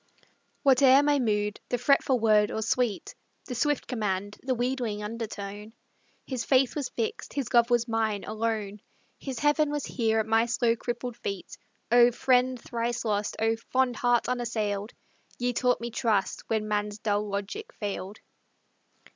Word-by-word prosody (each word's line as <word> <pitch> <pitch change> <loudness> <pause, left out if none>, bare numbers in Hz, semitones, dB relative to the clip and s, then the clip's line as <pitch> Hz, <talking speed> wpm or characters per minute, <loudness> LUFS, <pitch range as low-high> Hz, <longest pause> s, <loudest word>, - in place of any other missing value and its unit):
Whate'er 270 0 +6
my 290 -1 +3
mood 210 -3 0
the 245 - 0
fretful 260 0 +3
word, 215 -2 +4
or 220 - -2
sweet, 225 -2 -1 0.3
The 250 - -5
swift 290 +4 0
command, 205 -4 -2
the 260 0 -1
wheedling 240 -4 -2
undertone, 210 -1 -6 0.5
His 255 -4 -3
faith 260 +1 +3
was 285 -4 -2
fixed, 225 -2 -4
his 275 -5 -3
love 235 0 +5
was 240 0 +2
mine, 220 -3 0
alone, 215 -2 -3 0.4
His 265 -3 -5
heaven 295 +3 +2
was 295 -1 -2
here 225 -2 0
at 220 - 0
my 225 +1 +3
slow 235 -1 +2
crippled 240 +1 -5
feet: 195 -2 -5 0.4
Oh, 240 0 +7
friend 255 0 +2
thrice 235 0 -3
lost; 210 -1 -1
oh, 225 +1 +1 0.2
fond 255 -2 +2
heart 245 +1 +2
unassailed, 225 -4 -2 0.5
Ye 245 0 -1
taught 250 +1 +2
me 235 0 -5
trust 220 -4 -1
when 220 -1 0
man's 210 0 -1
dull 210 -1 -1
logic 200 - -4
failed. 200 -1 -5
230 Hz, 155 wpm, -27 LUFS, 210-250 Hz, 0.5 s, Oh